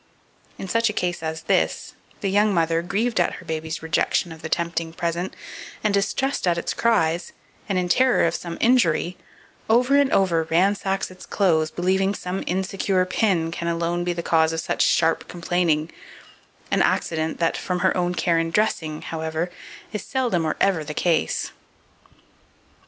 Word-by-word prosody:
In 190 Hz, -, -6 dB
such 230 Hz, +4 st, +2 dB
a -, -, -3 dB
case 175 Hz, -1 st, -1 dB
as 160 Hz, 0 st, -4 dB
this, -, -, 0 dB, 0.3 s
the 195 Hz, -, 0 dB
young 205 Hz, +2 st, +3 dB
mother, 165 Hz, -2 st, +1 dB
grieved 215 Hz, +5 st, -1 dB
at 175 Hz, -, +2 dB
her -, -, -10 dB
baby's 160 Hz, 0 st, -4 dB
rejection 160 Hz, +2 st, 0 dB
of 160 Hz, -1 st, -10 dB
the 160 Hz, -, -5 dB
tempting 165 Hz, -1 st, -2 dB
present, 175 Hz, +2 st, -3 dB, 0.5 s
and 210 Hz, -2 st, +2 dB
distressed 215 Hz, +4 st, 0 dB
at 170 Hz, -1 st, +2 dB
its 170 Hz, -, -2 dB
cries, 175 Hz, -7 st, +1 dB, 0.4 s
and 195 Hz, -, +1 dB
in 180 Hz, -1 st, 0 dB
terror 255 Hz, +5 st, +3 dB
of 165 Hz, -, +1 dB
some 170 Hz, -1 st, -5 dB
injury, 185 Hz, -8 st, +3 dB, 0.5 s
over 250 Hz, +4 st, +4 dB
and 280 Hz, -1 st, +4 dB
over 180 Hz, -4 st, +3 dB
ransacks 195 Hz, +2 st, +1 dB
its 185 Hz, 0 st, -13 dB
clothes, 160 Hz, -6 st, +2 dB
believing 190 Hz, +4 st, 0 dB
some 180 Hz, +1 st, -4 dB
insecure 190 Hz, 0 st, 0 dB
pin 180 Hz, -4 st, +1 dB
can 170 Hz, 0 st, -4 dB
alone 170 Hz, +1 st, -1 dB
be 175 Hz, -, -1 dB
the 170 Hz, -1 st, -4 dB
cause 160 Hz, -1 st, +3 dB
of 165 Hz, -, -2 dB
such -, -, -2 dB
sharp 165 Hz, -1 st, +2 dB
complaining, 170 Hz, -2 st, 0 dB, 0.8 s
an -, -, +3 dB
accident 160 Hz, -1 st, 0 dB
that, 165 Hz, -1 st, +1 dB
from 180 Hz, -1 st, -2 dB
her 190 Hz, -, +2 dB
own 180 Hz, -1 st, 0 dB
care 170 Hz, -1 st, +2 dB
in 165 Hz, 0 st, -1 dB
dressing, 165 Hz, -6 st, -1 dB
however, 160 Hz, +2 st, -3 dB, 0.4 s
is 210 Hz, -, -3 dB
seldom 240 Hz, -11 st, 0 dB
or 155 Hz, -, -1 dB
ever 190 Hz, -5 st, +2 dB
the 150 Hz, 0 st, -7 dB
case. 170 Hz, -3 st, 0 dB
175 Hz, 170 wpm, -23 LUFS, 165-195 Hz, 0.8 s, over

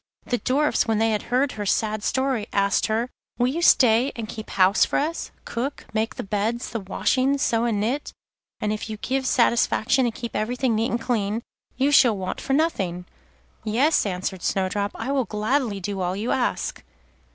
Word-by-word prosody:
The 245 Hz, -, -1 dB
Dwarfs, 285 Hz, 0 st, +1 dB
when 225 Hz, -1 st, +1 dB
they 225 Hz, +1 st, +2 dB
had 210 Hz, -, 0 dB
heard 260 Hz, +3 st, +2 dB
her 210 Hz, -1 st, -5 dB
sad 215 Hz, +1 st, 0 dB
story, 260 Hz, -5 st, 0 dB
asked 200 Hz, 0 st, +2 dB
her: 225 Hz, +2 st, 0 dB, 0.3 s
'Will 245 Hz, 0 st, +2 dB
you 320 Hz, +6 st, -2 dB
stay 250 Hz, -4 st, +5 dB
and 225 Hz, -2 st, -5 dB
keep 220 Hz, 0 st, -8 dB
house 190 Hz, +2 st, +4 dB
for -, -, +1 dB
us, 320 Hz, +4 st, -2 dB, 0.2 s
cook, 260 Hz, +5 st, -4 dB
make 220 Hz, +1 st, -1 dB
the -, -, -5 dB
beds, 215 Hz, +4 st, -2 dB
the 230 Hz, -, -2 dB
washing, 255 Hz, +7 st, +1 dB
sew 230 Hz, -3 st, +1 dB
and 225 Hz, -4 st, 0 dB
knit? 245 Hz, +8 st, -2 dB, 0.5 s
and 210 Hz, 0 st, -1 dB
if 215 Hz, +1 st, -5 dB
you 215 Hz, -, -5 dB
give 265 Hz, +4 st, -2 dB
satisfaction 240 Hz, +1 st, +3 dB
and 230 Hz, -, -4 dB
keep 235 Hz, -1 st, -6 dB
everything 245 Hz, +3 st, 0 dB
neat 225 Hz, +3 st, +1 dB
and 235 Hz, -, -1 dB
clean, 225 Hz, -2 st, -1 dB, 0.3 s
you 270 Hz, +3 st, +2 dB
shall 245 Hz, -7 st, +5 dB
want 185 Hz, -1 st, -4 dB
for 270 Hz, -, -2 dB
nothing.' 190 Hz, -, 0 dB, 0.6 s
'Yes,' 240 Hz, +4 st, +2 dB
answered 185 Hz, 0 st, -3 dB
Snowdrop, 195 Hz, +2 st, 0 dB
'I 230 Hz, +4 st, -3 dB
will 270 Hz, -3 st, +1 dB
gladly 215 Hz, 0 st, -1 dB
do 195 Hz, 0 st, -4 dB
all 180 Hz, +1 st, -1 dB
you 215 Hz, +5 st, -2 dB
ask. 250 Hz, -, -1 dB
225 Hz, 185 wpm, -24 LUFS, 210-260 Hz, 0.6 s, stay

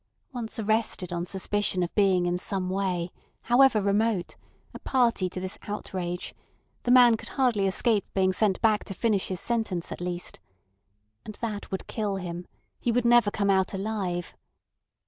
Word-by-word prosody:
Once 235 Hz, -3 st, -5 dB
arrested 215 Hz, -4 st, -1 dB
on 170 Hz, +1 st, -3 dB
suspicion 190 Hz, -1 st, 0 dB
of 170 Hz, -, -4 dB
being 190 Hz, -4 st, +3 dB
in 175 Hz, 0 st, 0 dB
some 185 Hz, 0 st, -2 dB
way, 180 Hz, -3 st, -1 dB, 0.3 s
however 245 Hz, -1 st, +5 dB
remote, 205 Hz, -1 st, 0 dB, 0.4 s
a -, -, -8 dB
party 235 Hz, -8 st, +1 dB
to 185 Hz, -, -6 dB
this 185 Hz, +1 st, -5 dB
outrage, 180 Hz, -4 st, -4 dB, 0.5 s
the -, -, -4 dB
man 245 Hz, -2 st, +7 dB
could -, -, -9 dB
hardly 235 Hz, -7 st, +1 dB
escape 210 Hz, +2 st, +2 dB
being 190 Hz, -1 st, +3 dB
sent 195 Hz, -1 st, +1 dB
back 215 Hz, -2 st, +3 dB
to 195 Hz, -, -7 dB
finish 215 Hz, -3 st, +1 dB
his 185 Hz, -2 st, -3 dB
sentence 220 Hz, -7 st, -2 dB
at -, -, -6 dB
least. 175 Hz, 0 st, -5 dB, 0.8 s
And 215 Hz, -, -8 dB
that 215 Hz, -3 st, -5 dB
would 190 Hz, -, -4 dB
kill 210 Hz, -3 st, -2 dB
him; 175 Hz, -2 st, -6 dB, 0.3 s
he 240 Hz, -, 0 dB
would 240 Hz, +1 st, +1 dB
never 235 Hz, -2 st, +5 dB
come 200 Hz, -1 st, +1 dB
out 190 Hz, 0 st, +1 dB
alive. 190 Hz, -4 st, -3 dB
200 Hz, 165 wpm, -27 LUFS, 185-225 Hz, 0.8 s, man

